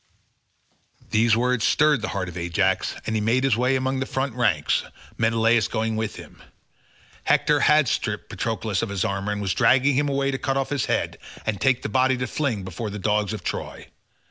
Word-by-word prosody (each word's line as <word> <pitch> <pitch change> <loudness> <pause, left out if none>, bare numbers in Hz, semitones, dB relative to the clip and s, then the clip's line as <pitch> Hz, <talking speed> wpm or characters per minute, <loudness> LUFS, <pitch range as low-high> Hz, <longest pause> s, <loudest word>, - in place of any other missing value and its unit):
These 115 0 +3
words 125 -1 +1
stirred 150 -3 +3
the 115 - -2
heart 95 -3 -3
of 90 - -8
Ajax, 90 +2 0
and 110 - -2
he 110 - 0
made 120 +5 +1
his 135 -5 +3
way 125 +3 +1
among 130 0 -1
the 130 - -2
front 135 -1 -2
ranks, 105 -12 +1 0.3
Menelaus 115 -1 +2
going 110 -1 -2
with 110 0 -3
him. - - -13 0.8
Hector 150 -1 +3
had 150 -1 +4
stripped 105 -2 -2
Patroclus 110 -3 -2
of 115 - -3
his 100 -1 -1
armour, 100 -1 -2
and 105 0 -3
was 95 - 0
dragging 135 +2 +4
him 145 +2 +1
away 140 0 0
to 135 - -3
cut 135 -1 -1
off 135 - -1
his 145 - 0
head - - -1 0.3
and 110 -2 -2
take 135 -2 +2
the - - -1
body 130 +4 +2
to 125 - -2
fling 130 -9 -2
before 95 +4 -5
the 105 - -6
dogs 105 0 0
of - - -6
Troy. - - -5
115 Hz, 200 wpm, -24 LUFS, 105-130 Hz, 0.8 s, had